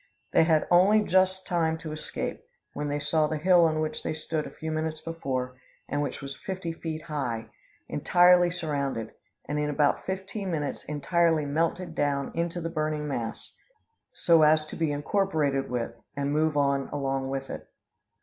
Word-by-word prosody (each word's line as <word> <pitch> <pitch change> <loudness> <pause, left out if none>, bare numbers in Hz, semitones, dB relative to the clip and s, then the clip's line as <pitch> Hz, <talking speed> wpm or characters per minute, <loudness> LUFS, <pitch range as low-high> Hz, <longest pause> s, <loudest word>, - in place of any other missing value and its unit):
They - - +5
had 160 -2 +3
only 200 +5 +6
just 185 0 +2
time 165 -3 +1
to 160 -1 -7
escape, 155 0 -4 0.3
when 145 0 -3
they 145 0 -1
saw 150 +1 +1
the 155 - -2
hill 175 +2 +5
on 155 -1 +1
which 155 0 -2
they - - -3
stood 155 0 -3
a - - -7
few 160 0 -6
minutes 155 0 -2
before, 130 -7 -4 0.3
and 145 - -1
which 145 - -4
was 140 0 -5
fifty 185 -3 -4
feet 160 -1 -5
high, 130 -8 -3 0.4
entirely 175 0 +5
surrounded, 140 -9 -3 0.3
and, 150 0 -2
in 150 0 0
about 145 0 +2
fifteen 195 +1 -4
minutes, 150 -5 -2
entirely 160 +1 +1
melted 165 +4 -1
down 140 -2 0
into 170 +1 -2
the 165 - -3
burning 155 -2 -2
mass, 120 -5 -4 0.6
so 165 -2 +4
as 155 0 +5
to 155 - -8
be 160 -3 0
incorporated 145 -3 0
with, 120 -2 -2 0.2
and 140 0 0
move 155 0 +2
on 140 -1 +1
along 135 -2 -1
with 135 0 -4
it. - - -7
155 Hz, 170 wpm, -27 LUFS, 145-170 Hz, 0.6 s, only